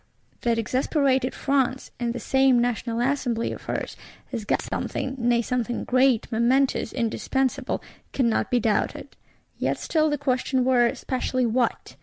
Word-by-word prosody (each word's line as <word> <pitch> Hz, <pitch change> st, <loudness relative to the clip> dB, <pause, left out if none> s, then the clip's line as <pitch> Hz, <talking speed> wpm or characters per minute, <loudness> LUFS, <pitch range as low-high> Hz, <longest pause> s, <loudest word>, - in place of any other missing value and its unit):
That 235 Hz, -1 st, +1 dB
exasperated 260 Hz, +2 st, +1 dB
France, 265 Hz, -2 st, 0 dB
in 240 Hz, -1 st, -1 dB
this 235 Hz, -1 st, -5 dB
same 265 Hz, -1 st, +4 dB
National 235 Hz, -1 st, 0 dB
Assembly 245 Hz, -3 st, 0 dB
of -, -, -7 dB
hers, -, -, -3 dB, 0.4 s
has 230 Hz, -5 st, -4 dB
got -, -, 0 dB
something, 265 Hz, -, -3 dB
nay 235 Hz, 0 st, +2 dB
something 245 Hz, 0 st, -2 dB
great, 255 Hz, -2 st, +3 dB
momentous, 245 Hz, +2 st, +2 dB
indispensable, 265 Hz, +2 st, -1 dB, 0.3 s
cannot 235 Hz, -5 st, +1 dB
be 245 Hz, -, +2 dB
doubted; 220 Hz, -2 st, -1 dB, 0.4 s
yet -, -, 0 dB
still 310 Hz, -1 st, +1 dB
the 295 Hz, -, 0 dB
question 260 Hz, -2 st, 0 dB
were: 245 Hz, -2 st, +3 dB
Specially 255 Hz, -1 st, -1 dB
_what? 235 Hz, +1 st, -1 dB
250 Hz, 140 wpm, -25 LUFS, 235-265 Hz, 0.4 s, same